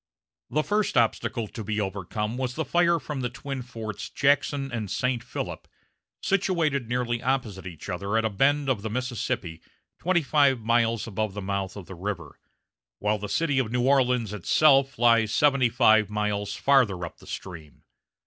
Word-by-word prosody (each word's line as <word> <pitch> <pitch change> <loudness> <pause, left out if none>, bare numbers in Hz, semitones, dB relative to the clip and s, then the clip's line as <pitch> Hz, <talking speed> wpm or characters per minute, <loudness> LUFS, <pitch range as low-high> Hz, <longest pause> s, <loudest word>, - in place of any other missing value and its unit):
The 155 +4 +1
first 210 -6 0
obstacle 115 -1 +1
to 110 - -7
be 105 +1 -2
overcome 105 +3 -3
was 125 -1 -3
the 160 - -2
fire 170 0 +3
from 145 -3 -5
the 125 - -1
twin 135 +1 -6
forts 115 -4 -6
Jackson 140 -1 +1
and 110 -4 -3
St. 125 +3 -1
Philip, - - -6 0.6
situated 165 - +1
nearly 120 -1 -1
opposite 115 -8 -2
each 85 -5 -9
other 100 +5 -2
at 115 - +1
a 110 - 0
bend 140 +7 +2
of 125 -6 0
the 110 - -4
Mississippi 110 -8 -3 0.4
twenty 175 -1 +1
five 140 -4 +3
miles 115 0 +1
above 110 -2 -3
the - - -4
mouth 95 -1 -3
of 100 -3 -8
the 95 - -9
river, 85 -4 -6 0.6
while 105 +1 0
the 105 0 -5
city 145 -5 +1
of 115 -4 -1
New 125 0 +1
Orleans 125 -5 +2
itself 135 - +3
lies 115 -2 +4
seventy 135 -2 +3
five 110 -3 +4
miles 105 -1 -2
farther 115 -11 +3
up 85 - -11
the - - -16
stream. 80 -6 -9
115 Hz, 170 wpm, -26 LUFS, 105-135 Hz, 0.6 s, lies